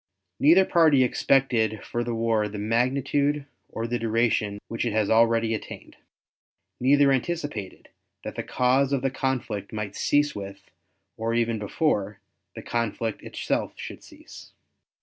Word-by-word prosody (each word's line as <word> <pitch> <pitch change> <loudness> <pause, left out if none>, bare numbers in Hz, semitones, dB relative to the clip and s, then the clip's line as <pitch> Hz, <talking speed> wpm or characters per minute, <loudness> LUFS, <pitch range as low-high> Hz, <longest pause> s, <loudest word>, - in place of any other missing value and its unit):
Neither 170 +6 +6
party 160 -7 +4
expected 120 -5 +1
for 120 - -2
the 120 -1 -3
war 115 -2 +1
the 105 0 -7
magnitude 135 +6 0 0.2
or 115 - -4
the 120 +1 -2
duration 115 -2 0
which 115 - -3
it 120 -3 -1
has 110 -2 +1
already 115 0 +3
attained. 110 - -7 0.8
Neither 140 +2 +4
anticipated 135 - -3 0.3
that - - -5
the - - -4
cause 130 +2 +1
of 135 -2 0
the 135 - +1
conflict 120 -7 -3
might 105 -2 -5
cease 145 0 +2
with, 100 -1 -9 0.5
or 115 +1 -1
even 115 -1 0
before, 105 - -1 0.4
the - - -8
conflict 115 -1 -2
itself - - -3
should - - -8
cease. - - -14
115 Hz, 140 wpm, -25 LUFS, 110-135 Hz, 0.8 s, Neither